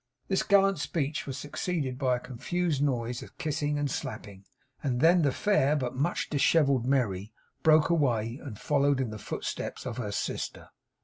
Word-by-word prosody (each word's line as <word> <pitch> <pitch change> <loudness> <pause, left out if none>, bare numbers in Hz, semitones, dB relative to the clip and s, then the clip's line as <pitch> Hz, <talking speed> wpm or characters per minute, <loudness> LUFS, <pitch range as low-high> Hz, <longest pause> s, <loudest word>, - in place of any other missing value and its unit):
This 190 - +2
gallant 195 -2 +4
speech 145 +1 -2
was 135 -1 -4
succeeded 145 -2 -3
by 130 -3 +2
a - - -3
confused 145 +5 -2
noise 125 -4 -1
of - - -12
kissing 150 -1 -1
and 145 0 0
slapping; 100 -5 -6 0.4
and 125 -4 -1
then 170 +4 +5
the 145 -3 +3
fair 150 -5 +2
but 130 -3 -2
much 145 +7 0
dishevelled 140 -4 +3
Merry 105 -7 0 0.3
broke 155 +1 +5
away, 120 -6 +1
and 120 -8 -7
followed 140 +2 +2
in 125 -4 -1
the 105 - -7
footsteps - - -5
of - - -4
her - - -3
sister. - - -4
140 Hz, 170 wpm, -29 LUFS, 125-155 Hz, 0.4 s, then